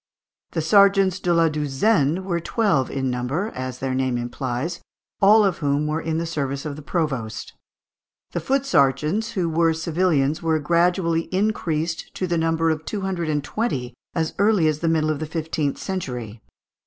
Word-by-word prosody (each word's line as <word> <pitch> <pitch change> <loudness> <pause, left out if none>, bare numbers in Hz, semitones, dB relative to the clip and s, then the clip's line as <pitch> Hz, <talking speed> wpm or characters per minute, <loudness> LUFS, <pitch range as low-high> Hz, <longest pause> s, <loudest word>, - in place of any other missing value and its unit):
The 160 - -1
sergeants 195 +1 +4
de 180 - 0
la 165 -1 +4
douzaine 150 +3 +1
were 175 -3 -1
twelve 170 - +1
in 130 -2 -1
number, 135 - -2
as 130 0 -5
their 130 0 -2
name 130 -1 0
implies, 125 +6 -3 0.4
all 210 +2 +6
of 190 -3 0
whom 145 -1 +1
were 155 +2 -1
in 160 0 -2
the 165 - -1
service 140 -3 -3
of 150 -2 -4
the 150 - -9
provost; 135 - -3 0.8
the - - -2
foot 275 0 0
sergeants, 155 - +1
who 180 -4 0
were 165 0 +2
civilians, 160 -3 +1
were 160 -1 +1
gradually 170 +1 +1
increased 170 -5 -1
to 185 - -1
the 170 -2 0
number 165 0 +1
of 155 0 -3
two 205 +4 -4
hundred 185 -4 -2
and 145 -2 0
twenty 140 - -2 0.2
as 160 -2 -1
early 200 -5 +4
as 155 -1 0
the 165 - 0
middle 155 -1 +2
of 150 - -3
the 155 - -4
fifteenth 155 -2 -2
century. 125 - -5
160 Hz, 175 wpm, -23 LUFS, 140-180 Hz, 0.8 s, all